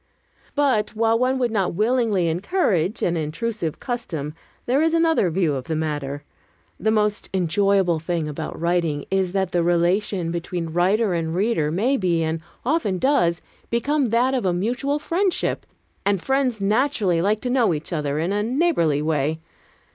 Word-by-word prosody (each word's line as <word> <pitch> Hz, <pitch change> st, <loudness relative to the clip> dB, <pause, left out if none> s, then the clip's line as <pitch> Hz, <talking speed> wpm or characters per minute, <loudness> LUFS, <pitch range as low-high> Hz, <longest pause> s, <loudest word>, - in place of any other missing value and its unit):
But 260 Hz, -8 st, +1 dB
while 225 Hz, +1 st, +2 dB
one 255 Hz, +1 st, +2 dB
would 245 Hz, -3 st, 0 dB
not 195 Hz, -6 st, 0 dB
willingly 215 Hz, -4 st, +2 dB
encourage 185 Hz, -, 0 dB
an 170 Hz, -, +1 dB
intrusive 165 Hz, +2 st, -3 dB
custom, 165 Hz, -, -4 dB, 0.3 s
there 265 Hz, +4 st, +2 dB
is 325 Hz, +1 st, +2 dB
another 325 Hz, -, +3 dB
view 170 Hz, -3 st, +1 dB
of 130 Hz, -2 st, -4 dB
the 160 Hz, -, -2 dB
matter. 145 Hz, -2 st, -3 dB, 0.6 s
The 220 Hz, -, +1 dB
most 210 Hz, -1 st, +1 dB
enjoyable 190 Hz, -1 st, +2 dB
thing 165 Hz, -1 st, -2 dB
about 150 Hz, +2 st, -5 dB
writing 170 Hz, -4 st, 0 dB
is 190 Hz, -2 st, +1 dB
that 190 Hz, -2 st, 0 dB
the 175 Hz, -, +1 dB
relation 175 Hz, +1 st, +1 dB
between 170 Hz, -1 st, -4 dB
writer 190 Hz, +4 st, +2 dB
and 165 Hz, -1 st, -2 dB
reader 190 Hz, -6 st, +1 dB
may 225 Hz, -, +1 dB
be 175 Hz, -5 st, +1 dB
and 160 Hz, 0 st, -2 dB, 0.2 s
often 255 Hz, -, +1 dB
does 175 Hz, -9 st, +2 dB, 0.3 s
become 275 Hz, +4 st, +1 dB
that 240 Hz, +4 st, +2 dB
of 190 Hz, -9 st, 0 dB
mutual 245 Hz, +9 st, -1 dB
friendship; 350 Hz, +5 st, -1 dB, 0.4 s
an 200 Hz, 0 st, +2 dB
friends 260 Hz, +2 st, 0 dB
naturally 205 Hz, -, +1 dB
like 205 Hz, +4 st, +1 dB
to 250 Hz, -, -2 dB
know 245 Hz, -6 st, +3 dB
each 160 Hz, +2 st, -4 dB
other 150 Hz, -2 st, -1 dB
in 170 Hz, +5 st, 0 dB
a 205 Hz, -, 0 dB
neighborly 220 Hz, -, +1 dB
way. 155 Hz, 0 st, 0 dB
190 Hz, 160 wpm, -23 LUFS, 165-235 Hz, 0.6 s, another